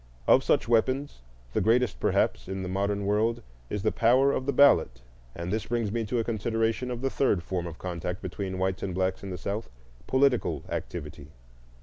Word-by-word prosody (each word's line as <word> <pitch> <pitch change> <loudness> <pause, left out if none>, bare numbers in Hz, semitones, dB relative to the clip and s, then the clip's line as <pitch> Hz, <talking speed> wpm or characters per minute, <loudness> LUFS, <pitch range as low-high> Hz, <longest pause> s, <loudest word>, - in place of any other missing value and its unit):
Of - - +5
such - - +2
weapons 130 - +1 0.3
the - - +1
greatest, 115 +2 +2
perhaps, - - +1
in 95 0 -4
the - - -4
modern 100 +2 -1
world 110 +3 +1 0.3
is 105 -2 -3
the 110 - +2
power 130 +4 +4
of 130 -1 -2
the - - +3
ballot; 125 - +4 0.3
and 85 +3 -4
this 110 - -2
brings 115 -3 -1
me 115 0 -1
to 120 +4 -2
a 115 - +1
consideration 115 +2 -1
of 120 -1 -4
the 135 0 -1
third 100 -10 +1
form 90 -2 -3
of 85 -1 -8
contact 90 0 -4
between 95 +1 -5
whites 95 0 -1
and 95 -3 -3
blacks 95 0 0
in 100 - -7
the 90 - -4
South,—political 100 - -1
activity. 75 -3 -6
105 Hz, 190 wpm, -27 LUFS, 90-120 Hz, 0.3 s, Of